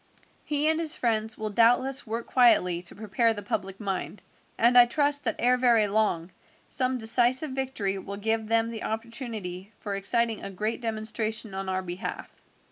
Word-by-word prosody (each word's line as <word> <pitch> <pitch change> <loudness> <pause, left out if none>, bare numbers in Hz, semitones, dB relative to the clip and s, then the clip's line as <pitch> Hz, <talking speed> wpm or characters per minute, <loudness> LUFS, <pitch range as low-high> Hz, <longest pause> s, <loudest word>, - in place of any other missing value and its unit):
He 295 0 0
and 320 0 +2
his 320 -1 +1
friends 220 -2 -1
will 215 -1 -4
doubtless 245 +5 +3
work 230 +2 -4
quietly 180 -9 +3
to 175 - -8
prepare 220 +2 +1
the 205 - -7
public 195 -1 -4
mind, 200 0 -4 0.3
and 240 +2 +4
I 245 -1 +8
trust 285 +2 +1
that 225 - 0
ere 250 +1 +3
very 235 -4 +3
long 200 -5 0 0.4
some 255 0 -1
decisive 245 +5 +2
victory 260 -8 -2
will 200 +1 -7
give 220 +1 -1
them 230 +1 +1
the 225 - -7
opportunity 220 -4 -5
for 205 - -5
exciting 225 +3 +1
a - - -5
great 215 +5 -3
demonstration 220 -1 -2
on 190 0 -4
our 185 0 -1
behalf." 175 +1 -7
225 Hz, 170 wpm, -27 LUFS, 200-245 Hz, 0.4 s, I